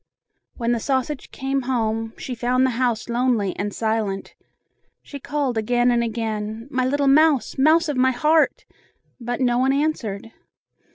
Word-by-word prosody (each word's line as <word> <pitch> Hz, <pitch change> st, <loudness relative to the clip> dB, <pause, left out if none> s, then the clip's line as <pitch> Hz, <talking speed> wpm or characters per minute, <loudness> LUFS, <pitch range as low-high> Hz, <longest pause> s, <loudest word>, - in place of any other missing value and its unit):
When 235 Hz, -1 st, -1 dB
the 240 Hz, -, +1 dB
sausage 265 Hz, +3 st, -2 dB
came 270 Hz, +1 st, -2 dB
home, 225 Hz, -2 st, -1 dB
she 255 Hz, -, -6 dB
found 245 Hz, +2 st, +1 dB
the 260 Hz, -, +1 dB
house 240 Hz, -1 st, -1 dB
lonely 235 Hz, -5 st, 0 dB
and 205 Hz, 0 st, -2 dB
silent. 220 Hz, -3 st, -2 dB, 0.7 s
She 285 Hz, -, -9 dB
called 275 Hz, -4 st, -2 dB
again 245 Hz, +2 st, +2 dB
and 235 Hz, -1 st, +2 dB
again, 220 Hz, 0 st, -4 dB
"My 255 Hz, -2 st, 0 dB
little 285 Hz, +1 st, 0 dB
mouse! 290 Hz, -1 st, +3 dB
Mouse 320 Hz, +4 st, +4 dB
of 295 Hz, -3 st, -2 dB
my 260 Hz, +1 st, +4 dB
heart!" 305 Hz, +5 st, +2 dB, 0.5 s
but 240 Hz, +1 st, -4 dB
no 245 Hz, -1 st, +2 dB
one 260 Hz, +1 st, +3 dB
answered. 230 Hz, -8 st, -2 dB
245 Hz, 155 wpm, -22 LUFS, 225-270 Hz, 0.7 s, Mouse